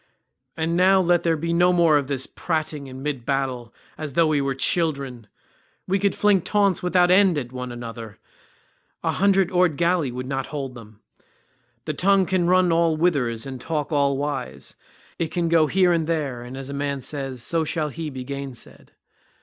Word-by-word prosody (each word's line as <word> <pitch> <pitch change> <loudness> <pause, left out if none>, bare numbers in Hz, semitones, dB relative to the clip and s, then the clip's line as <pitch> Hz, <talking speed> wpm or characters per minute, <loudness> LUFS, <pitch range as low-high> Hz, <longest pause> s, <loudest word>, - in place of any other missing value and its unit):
And 165 +1 -1
now 190 +2 +5
let 175 -1 +3
there 165 -1 +1
be 165 +2 -2
no 175 +1 +4
more 170 -3 +4
of 140 -2 +1
this 135 -2 -1
prating 155 -4 -3
in 130 0 -9
mid 145 -5 -3
battle 130 -3 -2 0.3
as 150 -3 -5
though 165 +3 +4
we 155 -2 +1
were 135 -1 -1
children. 140 -7 0 0.6
We 195 +1 +1
could 200 0 +1
fling 205 -3 +3
taunts 200 -1 +1
without 180 0 +3
end 185 -3 +5
at 125 -4 -4
one 125 -1 -6
another; 115 -2 -8 0.9
a - - +1
hundred 195 -1 +2
oared 180 -5 +2
galley 170 -5 +1
would 125 +1 -5
not 135 0 -3
hold 135 -4 -5
them. 110 -3 -14 0.8
The 155 - -2
tongue 195 +4 +3
can 185 -2 0
run 180 -1 +4
all 165 -1 +2
whithers 140 -9 0
and 130 -2 -7
talk 155 -1 -3
all 140 -2 +2
wise; 140 -3 -4 0.5
it 165 - 0
can 170 0 -1
go 165 -2 +4
here 180 +1 +3
and 165 -2 0
there, 145 -7 -2
and 125 +2 -8
as 135 0 -6
a - - -5
man 140 -1 -2
says, 135 -3 -5
so 165 +3 0
shall 155 -1 -1
he 160 +2 -5
be 130 -2 -7
gainsaid. 140 -1 -8
150 Hz, 190 wpm, -23 LUFS, 135-175 Hz, 0.9 s, now